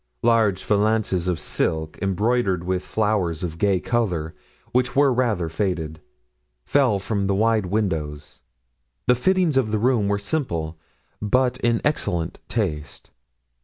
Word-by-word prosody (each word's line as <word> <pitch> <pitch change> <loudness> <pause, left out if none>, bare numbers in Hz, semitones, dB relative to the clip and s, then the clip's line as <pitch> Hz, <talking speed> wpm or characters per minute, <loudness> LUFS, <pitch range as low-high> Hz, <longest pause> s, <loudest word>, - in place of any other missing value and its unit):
Large 110 -5 +3
valances 105 -3 +1
of 90 -3 0
silk, 80 -1 -1
embroidered 100 -1 +1
with 90 0 -1
flowers 100 -7 0
of 85 -2 -4
gay 100 -3 +2
colors, 90 -9 -1 0.4
which 125 0 +1
were 140 -1 +4
rather 115 -9 0
faded, 80 -2 -2 0.6
fell 130 -8 +3
from 100 0 -2
the 100 - +1
wide 110 -1 +2
windows; 80 - -3 0.6
the 125 - +5
fittings 175 +3 +2
of 125 -5 +2
the 110 - 0
room 115 -2 +2
were 100 0 +1
simple, 85 - -3 0.4
but 125 +4 +1
in 120 -1 +1
excellent 90 - -1
taste. 80 -10 -3
100 Hz, 130 wpm, -23 LUFS, 85-120 Hz, 0.6 s, the